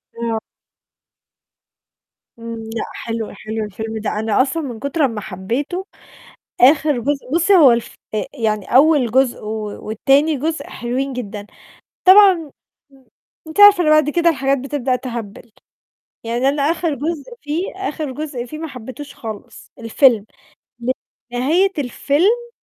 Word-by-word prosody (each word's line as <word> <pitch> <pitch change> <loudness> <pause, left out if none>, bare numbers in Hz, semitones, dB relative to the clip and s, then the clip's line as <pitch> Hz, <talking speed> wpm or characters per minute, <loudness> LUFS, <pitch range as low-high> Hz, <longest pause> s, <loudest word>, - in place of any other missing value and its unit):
آه. 230 -1 -2 2.0
إمم، 230 0 -6 0.2
لأ 225 - -2
حلو 225 -1 -5
حلو 220 +2 -5
الفيلم 220 +2 -6
ده. 215 - -2
أنا 220 +2 +2
أصلًا 300 +5 -1
من 245 -5 -6
كتر 280 +3 0
أما 225 -5 -3
حبيته 240 - -4 0.8
آخر 290 +1 +5
جُزء 275 +1 -2
بُصي 345 +4 +3
هو 290 -9 +8
الف 235 -1 -2 0.2
أ 210 - -1
يعني 215 -6 -1
أول 280 -4 +5
جُزء 260 0 +1
و 215 -1 -5
وتاني 280 +7 +2
جزء 315 +4 -3
حلوين 260 +3 -3
جدًا. 210 -4 -6 0.6
طبعًا 390 +1 +8 0.6
م 270 -1 -22 0.4
أنتِ 315 +6 -2
عارفة 410 -3 +8
إن 305 - +3
بعد 305 -1 +4
كده 340 +2 +2
الحاجات 275 -2 0
بتبدأ 265 -1 -1
تهبّل. 235 -3 -7 0.7
يعني 240 +3 0
أنا 285 +1 -1
آخر 325 0 0
جزء 315 - -4
فيه، 300 +4 -2
آخر 310 -7 -4
جزء 280 -3 -5
فيه 305 +5 -8
ما 320 +1 -5
حبيتهوش 275 +2 -9
خالص 220 -3 -9
الفيلم. 230 -1 +3 1.1
نهاية 320 +11 +2
الفيلم 350 - 0
270 Hz, 135 wpm, -19 LUFS, 230-310 Hz, 2.0 s, هو